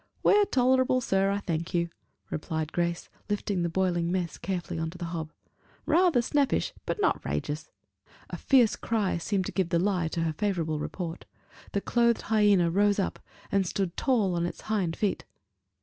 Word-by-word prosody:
"We're 415 0 +5
tolerable, 260 -3 +3
sir, 195 -5 +1
I 200 - +1
thank 170 -1 -3
you," 170 0 +1 0.4
replied 155 0 -3
Grace, 170 0 -1 0.2
lifting 205 -2 -1
the 170 - 0
boiling 175 -1 0
mess 180 -3 -2
carefully 175 -2 -3
on 160 0 -2
to 175 - -10
the 175 - -5
hob: 160 -2 -4 0.5
"rather 335 -8 +4
snappish, 280 +2 +1
but - - -2
not 415 - +1
'rageous." - - -3 0.6
A - - -3
fierce 250 -5 +4
cry 210 -6 -1
seemed 190 +2 -1
to - - -4
give 190 -3 0
the 170 - +2
lie 180 -2 +1
to 165 +1 -3
her 165 -1 0
favorable 165 -4 -1
report: 170 +1 -5 0.5
the 200 - 0
clothed 235 +1 +2
hyena 200 -5 +4
rose 205 +2 +3
up, 195 - -1 0.3
and 195 -2 +2
stood 185 -1 -2
tall 220 -9 +1
on 170 0 0
its - - -7
hind 195 -6 -1
feet. 205 -2 -1
190 Hz, 175 wpm, -28 LUFS, 170-215 Hz, 0.6 s, We're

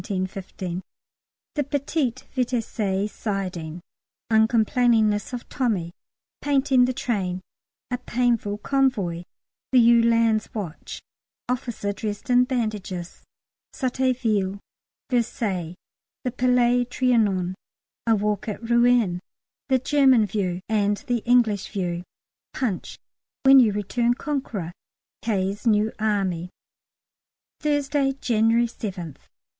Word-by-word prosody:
_ 185 -2 -4 0.7
The 295 - 0
Petit 280 -2 -1 0.2
Vitesse 215 -5 -1
siding 180 -6 -4 0.5
Uncomplainingness 220 -1 +3
of 245 -1 -6
Tommy 200 -10 -1 0.5
Painting 270 -3 +3
the 255 - -1
train 195 -8 -2 0.5
A 250 - -1
painful 235 -4 0
convoy 210 -10 0 0.5
The 260 - +4
"Yewlan's" 230 -2 +4
watch 180 -7 -6 0.4
"Officer 240 -5 -2
dressed 210 +3 -4
in 250 0 +5
bandages" 210 -8 -3 0.5
Sotteville 240 -7 0 0.5
Versailles 200 -8 -1 0.5
The 250 - -1
Palais 245 0 +3
Trianon 220 -8 +1 0.5
A 225 - +5
walk 210 +1 -1
at 225 +2 -5
Rouen 235 -6 +3 0.5
The 260 - +4
German 260 -3 +4
view, 185 -3 -2
and 205 -1 +1
the 245 -1 0
English 235 -5 +3
view 175 -4 -2 0.5
'Punch' 225 -9 -3 0.5
"When 270 0 +8
you 230 -4 +5
return 235 +4 0
Conqueror" 250 - -3 0.5
K.'s 200 0 -1
new 215 0 +3
Army. 195 -5 0 1.1
_Thursday, 285 -2 0
January 230 -1 +3
7th. 190 - -6
225 Hz, 95 wpm, -24 LUFS, 195-250 Hz, 1.1 s, When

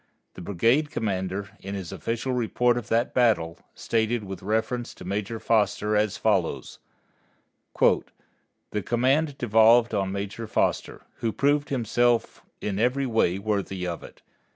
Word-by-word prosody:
The - - -10
brigade 115 - +2
commander, 100 -3 -3
in 100 +1 -6
his 95 -4 -6
official 120 +3 -3
report 120 0 +1
of 120 -2 -4
that 115 +2 +1
battle, 110 -10 +2 0.2
stated 115 0 0
with 95 -2 -7
reference 110 +4 -2
to - - -11
Major 105 +3 -3
Foster 105 -1 +1
as 105 -1 +1
follows: - - 0 1.0
"The 105 - -2
command 135 - +1
devolved 115 0 +5
on 95 -2 0
Major 100 +3 -5
Foster, - - -1
who 115 - -1
proved 145 +4 +1
himself 120 -2 +1 0.2
every 125 +7 0
way 110 -7 +1
worthy 100 -2 -2
of 85 -1 -4
it. - - -14
110 Hz, 130 wpm, -26 LUFS, 100-120 Hz, 1.0 s, devolved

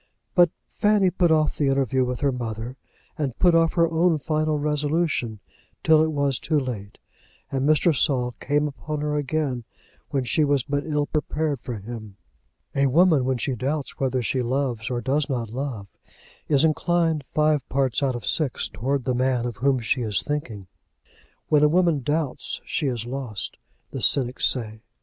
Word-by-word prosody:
But 175 -1 +6 0.2
Fanny 205 -3 +2
put 175 -1 +2
off 155 -1 +2
the 145 - +2
interview 135 -1 +2
with 125 0 -3
her 140 -1 +2
mother, 120 0 -5 0.6
put 175 -2 +4
off 165 -1 +3
her 170 -1 +3
own 165 0 +2
final 155 +1 0
resolution, 150 -6 -1 0.4
till 160 -1 +5
it 160 - 0
was 140 -3 0
too 155 -2 +1
late, 110 -7 -6 0.5
and 135 +2 0
Mr. 155 +1 +4
Saul 125 -2 +2
came 145 +1 +1
upon 150 +1 -5
her 150 0 -1
again, 145 -3 -1 0.5
when 135 -2 0
she 150 +5 +1
was 140 -3 +2
but 145 +3 -2
ill 150 -1 0
prepared 150 -2 -2
for 120 -3 -5
him. 110 -1 -8 0.6
A 140 0 +2
woman, 155 -1 +4
when 130 -1 0
she 130 +3 -1
doubts 135 +4 -3
whether 130 -2 0
she 130 +3 0
loves 125 -3 -1
or 120 -1 -2
does 140 +5 0
not 120 -5 -2
love, 125 -5 -4 0.6
is 145 0 +4
inclined 165 -1 +1
five 150 -2 +1
parts 135 -1 +1
out 135 -3 +1
of 120 - -6
six 150 -6 0
towards 130 +8 -2
the 130 - 0
man 125 -1 +1
of 120 -4 -4
whom 135 +1 +2
she 125 +3 0
is 105 -4 0
thinking. 125 -10 -4 0.8
When 150 -1 +4
a 150 - +5
woman 170 -3 +2
doubts 145 +1 -2
she 150 - -1
is 120 -3 -2
lost, 120 -5 -4 0.3
the - - -5
cynics 130 -2 +3
say. 110 -3 -1
140 Hz, 175 wpm, -24 LUFS, 125-155 Hz, 0.8 s, But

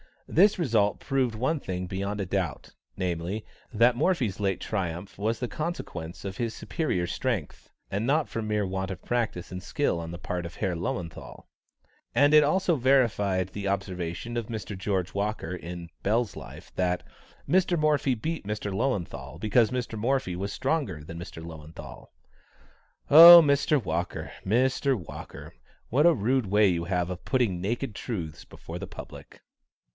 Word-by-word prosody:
This 200 +5 +4
result 110 - +1
proved 130 -5 0
one 130 +8 0
thing 90 -6 -4
beyond 100 +2 -3
a - - -1
doubt, 95 -3 -3 0.2
namely, 90 +4 -3 0.3
that 120 +2 +4
Morphy's 125 - +1
late 95 -2 0
triumph 95 -2 -4
was 110 +3 0
the 125 - -2
consequence 120 - -5
of 95 -1 -5
his 115 -2 -2
superior 120 - -1
strength, 110 - -3 0.2
and 105 +4 -1
not 150 +2 +2
from 110 -1 -4
mere 105 -1 0
want 95 0 -3
of 95 -3 -7
practice 115 -8 -2
and 90 0 -5
skill 100 - -1
on 85 0 -6
the 85 - -6
part 90 -1 -4
of 85 - -8
Herr 95 -4 -1
Löwenthal. 85 0 -5 0.7
And 145 +4 +5
it 150 -1 +8
also 175 +1 +2
verified 105 -8 +2
the 100 +1 -5
observation 95 +3 -3
of 115 -2 -2
Mr. 110 -2 -5
George 95 -2 -2
Walker, 100 -4 -2
in 85 -1 -7
Bell's 110 +2 0
Life, - - -11
that 90 -1 0 0.4
"Mr. 180 +2 +3
Morphy 150 -4 +2
beat 155 0 -4
Mr. 105 -1 -3
Löwenthal 100 -4 -2
because 110 +1 +3
Mr. 120 -3 -3
Morphy 125 -5 0
was 100 +3 -4
stronger 130 - -1
than 85 +2 -8
Mr. 80 -1 -8
Löwenthal." 80 -1 -10 1.0
Oh, 170 +3 +12
Mr. 140 -1 +2
Walker! 85 0 -3
Mr. 130 +6 +2
Walker! 85 -6 -9 0.4
what 145 +7 +4
a 170 - +6
rude 125 -1 +1
way 105 +1 +4
you 85 -1 -1
have 90 -1 -1
of 90 0 -6
putting 115 -9 +1
naked 115 +4 -2
truths 85 - -5
before - - -9
the - - -6
public! - - -11
105 Hz, 160 wpm, -27 LUFS, 90-130 Hz, 1.0 s, Oh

